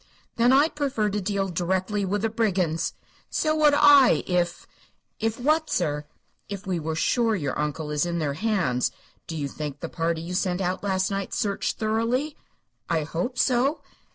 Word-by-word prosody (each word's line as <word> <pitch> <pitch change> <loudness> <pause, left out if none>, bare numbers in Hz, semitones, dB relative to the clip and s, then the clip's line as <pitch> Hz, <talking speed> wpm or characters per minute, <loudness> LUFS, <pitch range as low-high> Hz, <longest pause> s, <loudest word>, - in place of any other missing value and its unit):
"Then 235 +2 +4
I'd 285 +4 +4
prefer 265 -8 0
to 205 +1 -1
deal 195 0 -1
directly 190 +4 -1
with 205 +2 -1
the 225 - +2
brigands." 180 -7 0 0.4
"So 310 0 +1
would 300 -2 +5
I, 290 -2 +6
if 175 -1 -1 0.3
" - - -48
"If 225 +1 -1
what, 310 +4 +2
sir?" 150 - -1 0.4
"If 200 0 -6
we 185 -3 -1
were 160 0 -3
sure 225 +7 +2
your 145 -8 -2
uncle 150 +1 -2
is 150 -1 +1
in 175 0 -2
their 150 -4 -1
hands. 165 - 0 0.4
Do 165 - -5
you 145 -2 -2
think 145 0 -6
the 165 - -5
party 165 -1 -2
you 175 +2 -5
sent 180 -1 0
out 185 0 -1
last 190 -1 0
night 195 -1 -3
searched 200 -2 -1
thoroughly?" 230 +7 0 0.5
"I 165 -2 +1
hope 175 - -3
so." 260 +5 +2
195 Hz, 180 wpm, -25 LUFS, 165-230 Hz, 0.5 s, I